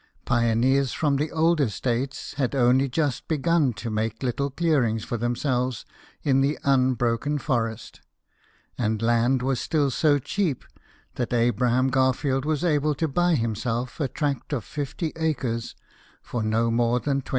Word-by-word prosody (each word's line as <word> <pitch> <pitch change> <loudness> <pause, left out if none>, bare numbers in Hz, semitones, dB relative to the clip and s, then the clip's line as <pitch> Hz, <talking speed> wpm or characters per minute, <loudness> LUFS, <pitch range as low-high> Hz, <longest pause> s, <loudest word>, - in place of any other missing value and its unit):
Pioneers 125 +3 +2
from 145 -3 +1
the 150 +3 -1
older 160 -5 +2
states 125 +5 -3
hc,d 135 -1 -1
only 130 +2 +3
just 145 -1 -1
begun 160 -2 +2
to 105 +3 -6
make 110 +2 -2
little 135 +3 -1
clearings 135 -8 +1
for - - -4
themselves 120 +1 -1 0.4
in 135 -1 +3
the 140 +3 +1
unbroken 130 +1 +1
forest; 115 -6 -3 0.8
and 110 -2 0
land 120 +2 +2
was 130 -1 0
still 145 -4 0
so 145 +3 +3
cheap 145 +1 -2 0.5
that 120 - -2
Abram 120 +2 +2
Garfield 130 +1 +1
was 155 0 -1
able 150 -3 +1
to 160 - 0
buy 175 +4 +2
himself 115 +1 -2
a 145 - +1
tract 145 +2 -3
of 125 -6 -2
fifty 150 +2 -4
acres 130 -8 -2 0.5
for 120 - -4
no 110 +2 +1
more 120 +1 +2
than 140 +1 -1
20. - - -15
130 Hz, 150 wpm, -25 LUFS, 120-145 Hz, 0.8 s, only